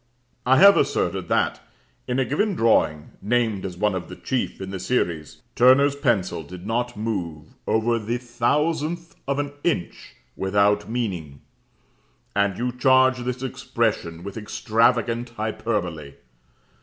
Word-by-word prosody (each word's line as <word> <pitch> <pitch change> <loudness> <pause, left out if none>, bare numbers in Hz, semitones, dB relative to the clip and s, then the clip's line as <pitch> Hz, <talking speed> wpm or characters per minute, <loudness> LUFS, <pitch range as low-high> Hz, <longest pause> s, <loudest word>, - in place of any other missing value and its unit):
I 130 +1 +6
have 200 +1 +8
asserted - - 0
that, - - +1 0.5
in 125 - -1
a 135 - +2
given 195 - 0
drawing 80 - +2
(named 110 -2 0
as 90 -2 -5
one 105 +1 +1
of 90 -3 -5
the - - -8
chief 130 -2 -3
in 95 0 -6
the 95 - -5
series), 85 -7 -2
Turner's 135 +3 +5
pencil 120 - 0
did 90 +4 -10
not 120 +1 -2
move 85 -8 -4
over 115 +1 +1
the 115 +3 -2
thousandth 150 +7 -1
of 140 0 0
an 145 0 -2
inch 160 - -2 0.2
without 100 +2 +1
meaning; 90 - -4 0.9
and 100 -2 +1
you 125 +1 -1
charge 130 0 +4
this 125 +1 -4
expression 85 -9 -2
with 100 +3 -7
extravagant 115 +2 +1
hyperbole. 95 -9 -3
115 Hz, 135 wpm, -23 LUFS, 95-125 Hz, 0.9 s, have